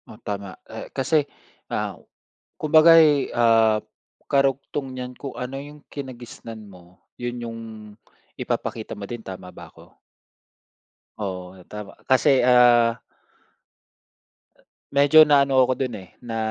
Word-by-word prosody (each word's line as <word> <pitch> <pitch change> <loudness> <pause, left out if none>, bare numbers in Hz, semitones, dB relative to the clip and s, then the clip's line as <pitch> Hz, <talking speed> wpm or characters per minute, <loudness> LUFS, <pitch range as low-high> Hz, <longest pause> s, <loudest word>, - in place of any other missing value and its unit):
O, 110 - -12
tama. 100 -3 -6
Eh, - - -9
kasi, 145 +2 +2 0.4
ah, - - -2 0.6
kumbaga 160 +2 +6
ay, 150 -3 +4
ah, 115 -2 +4 0.5
karugtong 135 -1 0
niyan 125 0 -6
kung 140 - -7
ano 125 +2 -5
yung 145 +1 -12
kinagisnan 120 -5 -9
mo, 90 -2 -17 0.2
yun 120 0 -4
yung 115 -1 -6 0.8
ipapakita - - -4
mo 100 - -6
din, 120 +3 -7
tama 90 -1 -9
ba - - -11
ako? - - -19 1.3
Oo, 95 -2 -6
tama. 105 -1 -8 0.2
Kasi, 130 +1 +4
ah 120 -2 +5 1.9
medyo 145 +3 +7
naano 140 -2 +3
ako 130 - +1
dun, 130 -4 -2
eh, 90 - -22
na 115 -2 -7
125 Hz, 120 wpm, -23 LUFS, 110-140 Hz, 1.9 s, medyo